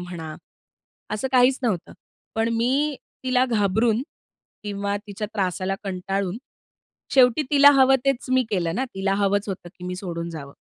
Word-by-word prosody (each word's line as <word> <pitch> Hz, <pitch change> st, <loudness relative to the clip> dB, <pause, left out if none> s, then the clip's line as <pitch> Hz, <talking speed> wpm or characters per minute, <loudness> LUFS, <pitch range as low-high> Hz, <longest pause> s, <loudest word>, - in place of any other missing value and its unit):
म्हणा, 170 Hz, -3 st, -7 dB, 0.8 s
असं 215 Hz, +5 st, -2 dB
काहीच 255 Hz, +1 st, +5 dB
नव्हतं. 205 Hz, -8 st, -1 dB, 0.4 s
पण 225 Hz, +1 st, +1 dB
मी 275 Hz, +5 st, +1 dB, 0.3 s
तिला 255 Hz, 0 st, +3 dB
घाबरून 220 Hz, +1 st, +1 dB, 0.6 s
किंवा 200 Hz, 0 st, -2 dB
तिच्या 210 Hz, +1 st, -5 dB
त्रासाला 190 Hz, -1 st, -1 dB
कंटाळून 195 Hz, 0 st, -2 dB, 0.8 s
शेवटी 255 Hz, +2 st, +5 dB
तिला 285 Hz, 0 st, +8 dB
हवं 265 Hz, 0 st, +6 dB
तेच 275 Hz, -2 st, +1 dB
मी 255 Hz, 0 st, +4 dB
केलं 170 Hz, -5 st, 0 dB
ना, 260 Hz, +6 st, 0 dB
तिला 195 Hz, 0 st, 0 dB
हवंच 200 Hz, +1 st, +1 dB
होतं 185 Hz, -2 st, -5 dB
की 180 Hz, -, -9 dB
मी 180 Hz, -, -4 dB
सोडून 170 Hz, -3 st, -5 dB
जावं. 140 Hz, -4 st, -8 dB
205 Hz, 145 wpm, -23 LUFS, 185-250 Hz, 0.8 s, तिला